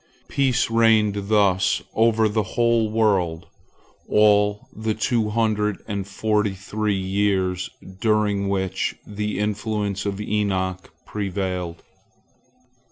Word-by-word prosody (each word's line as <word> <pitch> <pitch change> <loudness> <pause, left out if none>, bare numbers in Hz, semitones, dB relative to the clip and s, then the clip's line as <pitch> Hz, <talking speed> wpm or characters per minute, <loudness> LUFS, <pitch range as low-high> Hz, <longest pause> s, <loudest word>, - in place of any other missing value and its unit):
Peace 130 -4 +1
reigned 110 -3 +3
thus 100 -3 +2
over 110 -1 +3
the 110 +1 0 0.2
whole 115 -2 +3
world 95 -7 +1 0.6
all 105 -1 +3
the 110 0 -2
two 110 -1 0
hundred 105 -2 0
and 100 -2 -3
forty 105 0 0
three 105 +1 -2
years 95 -1 0 0.3
during 105 -3 +1
which 95 -1 -1
the 105 0 -3
influence 105 -1 -2
of 100 0 -3
Enoch 95 -4 -2
prevailed. 95 -4 -3
105 Hz, 100 wpm, -23 LUFS, 95-110 Hz, 0.6 s, reigned